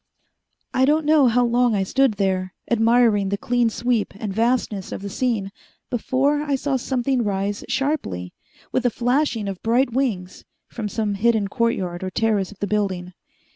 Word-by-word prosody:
I 260 - +3
don't 300 +2 +2
know 300 -3 +5
how 245 +1 +3
long 240 -1 +2
I 195 - +1
stood 260 +3 +2
there, 185 -2 -1 0.2
admiring 225 -3 +3
the 200 - -1
clean 240 +1 +1
sweep 235 -2 -1
and 205 -2 -4
vastness 225 -3 0
of - - -6
the 200 - -5
scene, 220 -6 -1 0.4
before 270 +5 +1
I 290 -2 0
saw 270 +1 -1
something 255 0 0
rise 200 0 -2
sharply, 260 - -2 0.4
with 255 - 0
a 245 - +3
flashing 245 -2 0
of 195 -2 -5
bright 240 +2 +2
wings, 215 -9 -2 0.2
from 215 -3 -5
some 215 -1 -1
hidden 215 0 +1
courtyard 195 -7 -1
or 185 - -2
terrace 210 -1 0
of 210 - -14
the 205 - -2
building. 190 -3 -2
230 Hz, 170 wpm, -22 LUFS, 200-250 Hz, 0.4 s, know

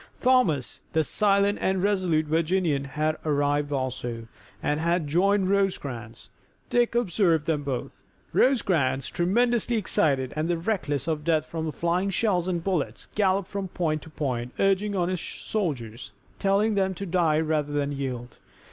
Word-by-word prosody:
Thomas, 250 - +2
the 160 - +3
silent 200 +4 +2
and 190 -1 +1
resolute 185 -6 +2
Virginian, 160 -2 +1
had 155 +3 -1
arrived 145 -1 +1
also, 125 -4 -3 0.4
and 150 +1 0
had 170 0 +1
joined 190 +5 +2
Rosecrans. 140 - -2 0.4
Dick 240 -1 +2
observed 180 -8 +2
them 155 -3 0
both. 135 -3 -4 0.3
Rosecrans, 165 - +2
tremendously 235 +6 +1
excited, 140 - +1
and 165 +2 -1
reckless 150 - -1
of 155 -2 -1
death 155 -1 +2
from 160 0 -4
the - - -2
flying 175 +5 0
shells 190 -3 +1
and 175 -3 -1
bullets, 180 -6 -2
galloped 195 -2 +1
from 200 -1 -4
point 160 -4 -1
to 160 - -12
point, 125 -5 -3
urging 195 +1 +2
on 175 -2 +1
his 185 -2 -2
soldiers, 125 - -4 0.3
telling 200 +2 +2
them 190 -2 +1
to 200 - -5
die 165 -4 +2
rather 155 -2 0
than 145 -1 -1
yield. 130 -3 -5
165 Hz, 145 wpm, -26 LUFS, 145-195 Hz, 0.4 s, the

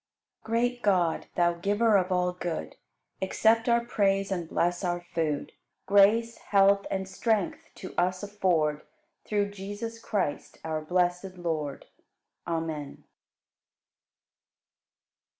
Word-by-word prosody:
43. - - -7 0.2
Great 245 0 -14
God, 180 -6 +1
Thou 175 -1 +3
Giver 205 +5 +2
of 185 -1 +2
all 180 0 +1
good, 175 -2 -4 0.5
Accept 225 +4 +2
our 235 0 +3
praise 195 -4 +1
and 175 -4 -2
bless 175 +2 0
our 175 -1 0
food. 160 -4 -2 0.3
Grace, 215 +4 +4
health, 200 0 +3
and 190 0 -2
strength 205 0 -1
to 185 - -9
us 185 +2 0
afford 175 -7 +1 0.5
Through 205 -1 0
Jesus 205 +4 -6
Christ, 190 -10 -2
our 155 -1 -2
blessed 180 +3 0
Lord. 155 -5 -3 0.6
Amen. 160 -4 -4
185 Hz, 115 wpm, -28 LUFS, 175-205 Hz, 0.6 s, Grace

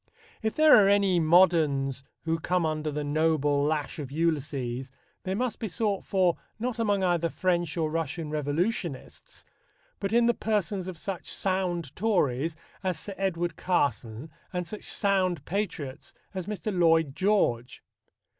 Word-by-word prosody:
If 220 -1 -1
there 310 0 +7
are 195 - +4
any 200 -3 +4
moderns 155 -6 +3 0.2
who 165 0 0
come 180 +1 0
under 155 -1 -1
the 150 0 -3
noble 145 -1 +2
lash 150 0 -1
of 140 -3 -6
Ulysses, 140 -5 -1 0.4
they 190 +1 -1
must 245 +2 -2
be 225 - -2
sought 205 0 -1
for 185 -3 +2 0.2
not 240 +1 -3
among 205 -4 +1
either 175 -2 +2
French 175 -2 0
or 155 -2 0
Russian 160 -1 -3
revolutionists, 155 - -3 0.5
but 195 0 -2
in 235 +1 +4
the 240 - +4
persons 205 -4 -1
of 185 -3 -6
such 190 +2 -5
sound 180 -6 -1
Tories 165 - +1 0.3
as 185 -3 -1
Sir 200 - -7
Edward 175 -4 -1
Carson 135 -5 -1 0.2
and 180 -1 -2
such 210 +4 -7
sound 185 -6 +1
patriots 165 -8 -4 0.2
as 185 -1 -5
Mr. 210 -1 -3
Lloyd 165 -5 +3
George. 185 - +1
170 Hz, 145 wpm, -28 LUFS, 150-195 Hz, 0.5 s, there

